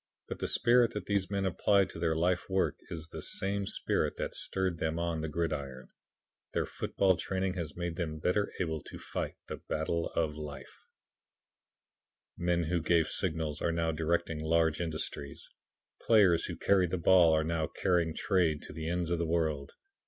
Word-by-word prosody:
But - - -6
the - - -1
spirit 120 0 +4
that 105 -3 -4
these 100 -2 0
men 100 -1 -1
apply 100 +2 +3
to 85 - -9
their 80 -1 +1
life 90 +3 0
work 95 0 +1
is 80 -2 -5
the - - -7
same 100 0 -1
spirit - - -1
that - - -3
stirred 95 -3 -2
them 80 0 -1
on 85 -1 -1
the 80 - -2
gridiron. 75 -5 -3 0.6
Their - - +1
football 95 -3 +1
training 95 0 -1
has 85 -5 -5
made 85 -1 -3
them 80 -3 -3
better 90 +6 0
able 80 -4 -1
to - - -9
fight - - -4
the - - -5
battle 80 +2 -2
of 80 -2 +1
life. 75 -2 -9 1.5
Men 85 0 +1
who 85 +1 0
gave 80 -1 +2
signals, 80 -3 0
are 85 - +1
now 85 0 0
directing 80 0 -1
large 80 +1 +2
industries. 80 -4 -4 0.5
Players 95 -7 +5
who - - -4
carried 95 -3 +3
the 95 - -1
ball, 85 -1 +6
are 80 0 +3
now 80 0 -1
carrying 85 -3 0
trade 85 -6 +1
to - - -9
the 80 +1 -4
ends 85 -1 -1
of 85 - +1
the 85 - 0
world. 80 -4 -1
85 Hz, 175 wpm, -31 LUFS, 80-90 Hz, 1.5 s, ball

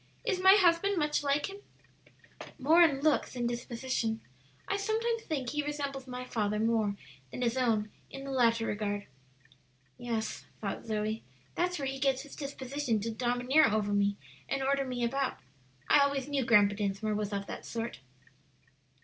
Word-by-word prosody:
"Is 400 -6 +1
my 380 +1 +9
husband 375 +1 +4
much 300 -2 +1
like 285 0 +1
him?" 395 0 -8 1.0
"More 315 +6 +5
in 285 -5 +4
looks 310 0 +2
than 245 -2 -2
disposition. 235 -1 -2 0.5
I 400 - 0
sometimes 450 +3 0
think 275 - -3
he 295 - 0
resembles 280 -2 -4
my 250 0 -5
father 210 -3 -1
more 220 -2 +1 0.3
than 250 - -4
his 235 0 +1
own 220 -5 +1 0.2
in 270 - -8
the 275 - -5
latter 230 -3 +3
regard. 205 -1 -2 0.9
"Yes," 230 -2 -3
thought 205 +2 -4
Zoe, 215 0 -1 0.3
"that's 355 +1 0
where 280 - -3
he 270 0 -3
gets 270 -1 +1
his 290 - -11
disposition 275 -4 -2
to 225 +2 -2
domineer 245 +6 +3
over 210 -1 0
me 200 0 +2 0.3
and 275 0 -1
order 275 0 +1
me 250 -2 -3
about. 265 +2 0 0.5
I - - +6
always 280 -1 +2
knew 280 -3 0
Grandpa 205 -3 +5
Dinsmore 205 +1 -1
was 210 0 -2
of 200 -1 -2
that - - -7
sort." 230 - -4
255 Hz, 165 wpm, -31 LUFS, 220-285 Hz, 1.0 s, my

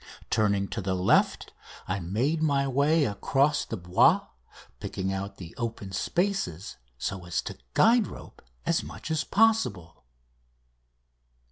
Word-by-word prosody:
Turning 100 -3 +2
to 115 - -4
the 95 -1 -1
left, 90 0 +2 0.3
I 95 +2 -1
made 120 - -1
my 140 -3 +2
way 145 +4 +3
across 135 +7 +1
the - - -5
Bois, 90 0 +4 0.6
picking 95 0 -3
out 100 +1 -5
the 85 -3 -9
open 115 -5 -4
spaces 105 - -2 0.2
so 95 +9 -4
as 85 - -1
to - - -7 0.2
guide 230 -2 +5
rope - - -11 0.2
as - - +2
much - - -8
as 160 -1 +1
possible. 195 - +1
105 Hz, 130 wpm, -27 LUFS, 95-150 Hz, 0.6 s, guide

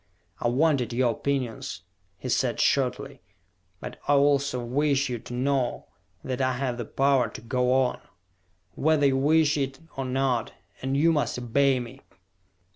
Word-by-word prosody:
"I - - 0
wanted 130 -2 +1
your 120 0 +2
opinions," 125 -8 -3 0.3
he - - -7
said - - 0
shortly. 135 0 0 0.6
"But - - -8
I 145 - +4
also 140 -3 +2
wish 140 +2 +1
you 120 -2 -3
to 120 - -10
know 130 -1 -1 0.3
that 130 0 -3
I 130 0 +1
have 125 -1 -3
the 120 - -3
power 135 +2 +2
to - - -9
go 125 +2 0
on, 130 -1 +1 0.7
whether 155 -1 +2
you 135 -1 +3
wish 150 +2 +3
it 135 -1 -2 0.2
or 135 -1 -3
not 130 -3 -1 0.3
_and 135 +1 -1
you 160 +4 +4
must 150 -5 0
obey 130 +2 +2
me! 125 +3 -9
135 Hz, 155 wpm, -26 LUFS, 125-140 Hz, 0.7 s, I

